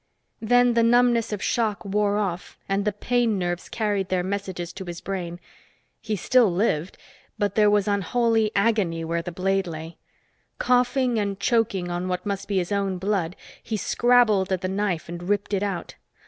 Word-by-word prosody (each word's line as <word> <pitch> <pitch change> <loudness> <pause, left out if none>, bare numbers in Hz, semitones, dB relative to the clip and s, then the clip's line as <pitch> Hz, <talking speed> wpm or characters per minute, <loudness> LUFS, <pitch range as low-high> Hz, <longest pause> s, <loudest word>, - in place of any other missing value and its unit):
Then 245 +2 +4
the 230 - +3
numbness 240 0 +3
of 205 -2 -3
shock 220 -3 0
wore 205 +1 +1
off 190 -4 -3
and 195 +1 0
the 210 - +2
pain 230 +1 0
nerves 175 -1 -3
carried 205 -4 -1
their 185 -1 0
messages 190 -3 -4
to 190 0 -7
his 175 -1 -6
brain. 175 -3 -5 0.6
He 215 -1 -2
still 230 +2 +3
lived, 175 -3 0 0.4
but 205 0 0
there 210 -1 +4
was 205 -1 +2
unholy 225 +2 +1
agony 200 -6 +1
where 170 +1 -1
the 175 +1 -6
blade 195 +1 0
lay. 160 0 -7 0.6
Coughing 250 -1 +2
and 200 -1 -2
choking 200 -6 +1
on 175 +1 -2
what 180 0 -3
must 200 -1 -3
be 200 - -1
his 180 +1 -1
own 195 -2 0
blood, 185 -2 -1 0.3
he 220 - -3
scrabbled 220 -4 +3
at 185 -1 0
the 185 - -1
knife 190 -3 -1
and 175 +2 -7
ripped 205 0 0
it 195 - +1
out. 195 -4 -3
200 Hz, 175 wpm, -24 LUFS, 180-220 Hz, 0.6 s, Then